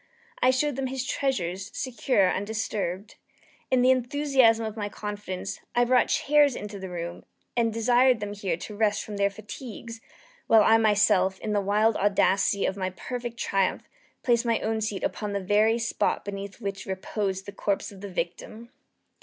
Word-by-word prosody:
I - - +5
showed 260 +1 +1
them 270 -1 -1
his 260 0 -3
treasures, 195 -11 -2
secure, 230 -6 +1
undisturbed. 205 -1 -3 0.5
In 255 -1 +3
the 255 - +6
enthusiasm 260 -3 +3
of 220 -1 -5
my 205 -2 -3
confidence, 205 -2 -5 0.2
I 245 0 +4
brought 250 0 +4
chairs 290 -2 +3
into 210 -1 -6
the 190 -1 -6
room, 170 -1 -6 0.3
and 230 -2 +2
desired 245 +2 +3
them 205 0 -4
here 195 -5 -2
to 210 +4 -8
rest 210 -1 +1
from 210 -1 -7
their 200 0 +2
fatigues, 225 +2 -9 0.5
while 220 -1 +6
I 225 +1 +5
myself, 205 -3 +3
in 210 - -3
the 205 - +2
wild 210 +3 +2
audacity 195 0 +2
of 190 - -1
my 185 -1 -1
perfect 240 +5 -6
triumph, 195 -4 0 0.4
placed 235 -1 +3
my 230 -2 +1
own 220 0 -1
seat 210 -2 -3
upon 210 -2 -2
the 200 - 0
very 210 +4 +3
spot 230 -1 -1
beneath 200 0 -6
which 200 -3 -5
reposed 190 0 -3
the 200 - -7
corpse 200 0 -2
of 195 -1 -13
the 200 - -6
victim. 195 +6 -5
210 Hz, 170 wpm, -26 LUFS, 195-235 Hz, 0.5 s, the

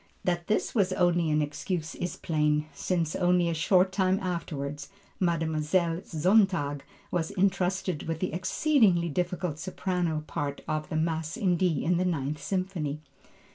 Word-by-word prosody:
That 175 -1 -1
this 215 - 0
was 195 -5 +2
only 175 -2 +2
an 150 0 +2
excuse, 160 +2 -3
is 175 - -4
plain, 150 -1 +1
since 165 +2 -1
only 180 -1 +3
a - - 0
short 185 +3 +3
time 190 0 +2
afterward 145 -5 -4 0.4
Mlle. 165 -3 0 0.4
Sontag 170 -4 +2 0.3
was 165 -2 0
intrusted 185 -3 0
with 165 -1 -2
the 185 - -2
exceedingly 185 - +3
difficult 175 -1 -2
soprano 175 -4 -2
parts 140 -2 -4
of 155 0 -2
the - - -3
Mass 160 +3 -1
in 190 -6 +2
D 170 -4 +1
and 175 +1 +2
the 185 - +1
Ninth 150 -4 -1
Symphony. 180 -5 -2
170 Hz, 145 wpm, -28 LUFS, 155-185 Hz, 0.4 s, only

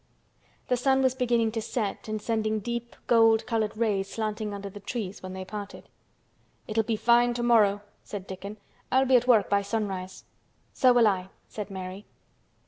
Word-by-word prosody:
The 250 - +1
sun 265 +1 +2
was 260 -1 +3
beginning 235 -3 +1
to 225 0 -3
set 215 -2 -3
and 215 0 -2
sending 215 0 -1
deep 235 +2 -5
gold 225 -1 +4
colored 220 -2 -1
rays 200 -4 0
slanting 215 -1 -3
under 200 0 -6
the 200 +1 -9
trees 205 -2 -5
when 185 0 -7
they 190 0 -6
parted. 205 0 -8 0.8
"It'll 220 +1 +1
be 220 +1 -1
fine 240 +2 +3
tomorrow," 225 -4 +3 0.2
said 200 -3 -7
Dickon. 195 +3 -8 0.3
"I'll 265 +1 +4
be 260 0 +4
at 245 0 +3
work 220 -6 +5
by 200 0 +2
sunrise." 195 -3 -4 0.5
"So 255 - +5
will 240 -2 +5
I," 190 -2 0 0.2
said 210 -1 -6
Mary. 190 +1 -7
215 Hz, 170 wpm, -27 LUFS, 200-235 Hz, 0.8 s, work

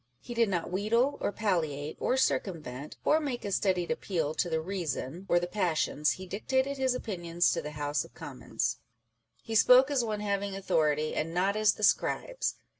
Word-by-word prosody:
He 240 - -8
did 230 -2 +2
not 175 -3 -2
wheedle, 230 +9 +1
or - - 0
palliate, 155 -9 -1
or 260 - +1
cir 260 - +3
cumvent, 150 -6 -8
or 310 - +4
make 275 -8 -4
a 200 - -3
studied 185 -2 +1
appeal 170 -10 -1
to 175 - -1
the 160 -1 0
reason 170 -1 -4
or 175 - +5
the 175 - -2
passions 170 -5 0
â€" - - -8
he 185 - -8
dictated 260 +8 -1
his 260 -1 +2
opinions 175 -7 0
to - - -1
the 150 - -7
House 145 -1 0
of - - -16
Commons. - - -3 0.6
"He 225 - -6
spoke 250 +5 +6
as 265 -4 +2
one 215 -2 -2
having 200 -1 -1
authority, 155 -5 +1
and 165 +2 -2
not 195 +3 +2
as 215 -1 +4
the 215 - -8
Scribes." - - +1
195 Hz, 190 wpm, -30 LUFS, 160-225 Hz, 0.6 s, spoke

